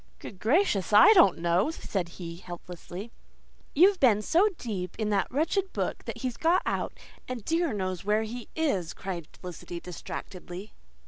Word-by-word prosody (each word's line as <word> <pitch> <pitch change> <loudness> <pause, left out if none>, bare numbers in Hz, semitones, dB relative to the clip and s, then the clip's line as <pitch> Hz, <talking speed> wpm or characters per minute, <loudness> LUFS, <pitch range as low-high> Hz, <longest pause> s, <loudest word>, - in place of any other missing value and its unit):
"Good 190 - -10
gracious, 220 - +2
I 215 - +9
don't 360 -5 +6
know," 170 +5 +2
he 320 - -3
said 185 - -3
helplessly. 175 +3 -8 0.6
"You've 370 +5 +6
been 215 -5 +4
so 360 - +4
deep 185 -7 -4
in 215 -2 -1
that 200 -2 +1
wretched 360 +8 0
book - - -3
that - - -5
he's 255 -2 -3
got 335 +3 +3
out, - - -2 0.3
and 250 -4 -5
dear 330 -1 +1
knows 185 -3 -3
where 210 +2 +2
he 235 +2 -7
is," 200 - 0
cried 175 -5 -5
Felicity 175 -1 -8
distractedly. 180 +2 -8
210 Hz, 155 wpm, -28 LUFS, 180-285 Hz, 0.6 s, I